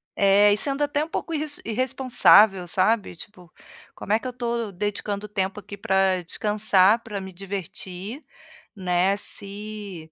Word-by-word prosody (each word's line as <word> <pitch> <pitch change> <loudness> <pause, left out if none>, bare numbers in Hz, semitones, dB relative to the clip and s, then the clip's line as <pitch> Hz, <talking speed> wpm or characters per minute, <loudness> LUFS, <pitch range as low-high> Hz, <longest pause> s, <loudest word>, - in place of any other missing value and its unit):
É. 200 +1 +5
E - - 0
sendo 275 +5 -1
até 290 +1 0
um - - -6
pouco 330 - -4
irres 300 -1 -2
irresponsável, 220 -5 +4
sabe, 195 +1 +1
tipo, 180 0 -14 0.4
como 205 - -3
é 220 - +3
que 255 - -7
eu - - -3
estou 235 -3 -3
dedicando 205 +1 -3
tempo 195 -1 -2
aqui 205 +1 -10
pra 190 -1 +1
descansar, 210 +3 +2
pra 210 -3 -5
me 190 -1 -9
divertir, 195 - -6 0.5
né, 185 0 +1
se 200 -5 -5
205 Hz, 150 wpm, -24 LUFS, 190-225 Hz, 0.5 s, É